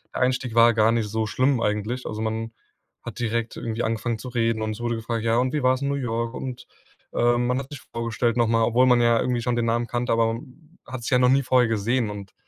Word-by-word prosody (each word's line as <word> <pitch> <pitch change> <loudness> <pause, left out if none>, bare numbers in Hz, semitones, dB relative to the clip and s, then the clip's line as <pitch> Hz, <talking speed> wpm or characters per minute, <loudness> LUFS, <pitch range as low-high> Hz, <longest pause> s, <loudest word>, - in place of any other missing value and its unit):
der - - -2
Einstieg 125 -2 0
war 115 0 +6
gar 110 0 +3
nicht 115 -2 0
so 110 +1 -2
schlimm 130 +3 +1
eigentlich. 105 +4 -2
Also, 110 +1 -4
man 110 +1 -3 0.5
hat - - -8
direkt 115 -1 -2
irgendwie 115 +1 -3
angefangen 115 +1 -1
zu 125 +3 -8
reden 115 -2 0
und 110 - -2
es 110 - -7
wurde 120 0 -1
gefragt: 115 0 -3
„Ja 115 0 +2
und 130 +2 +1
wie 150 - 0
war's 130 +1 +2
in 140 - 0
New 140 - 0
York?" 115 -3 -2
Und, 125 -1 -6 0.5
äh, 120 0 +2
man 125 +1 0
hat 135 0 -5
sich 145 - -8
vorgestellt 115 0 -1
noch 120 -1 +2
mal, 115 0 +3
obwohl 120 +3 +3
man 125 -1 +5
ja 120 -1 +4
irgendwie 125 -1 0
schon 120 0 -1
den 120 - 0
Namen 115 +1 0
kannte, 120 0 -2
aber 115 0 +2 0.5
hat 125 -2 -7
sich - - -3
ja 125 - +5
noch 125 0 +4
nie 135 +1 +4
vorher 125 -2 +3
gesehen. 115 +1 0
Und 100 -2 -8
120 Hz, 250 wpm, -24 LUFS, 115-125 Hz, 0.5 s, war